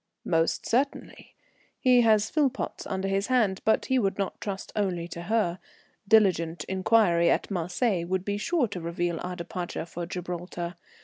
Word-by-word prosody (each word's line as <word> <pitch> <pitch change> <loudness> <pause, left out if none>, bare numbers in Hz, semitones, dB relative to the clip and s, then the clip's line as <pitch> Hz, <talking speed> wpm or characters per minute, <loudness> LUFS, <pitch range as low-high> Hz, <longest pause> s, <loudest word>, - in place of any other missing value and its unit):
"Most 165 -1 +1
certainly. 270 +4 -2 0.4
He 250 -1 +5
has 220 -2 +3
Philpotts 290 -5 -1
under 190 -1 -2
his 195 +1 0
hand, 220 -7 +2
but 220 - +2
he 260 -1 +2
would 195 -4 0
not 195 -2 -3
trust 195 -2 -5
only 180 -5 -1
to 170 - -7
her. 190 -2 0 0.5
Diligent 180 -6 +3
inquiry 190 -3 +3
at - - 0
Marseilles 180 +1 0
would 185 +1 -1
be 205 0 -1
sure 300 +2 +1
to 185 -3 -5
reveal 170 0 -2
our 180 0 -4
departure 175 -1 -5
for 170 0 -6
Gibraltar. 175 -1 -5
190 Hz, 160 wpm, -27 LUFS, 175-220 Hz, 0.5 s, He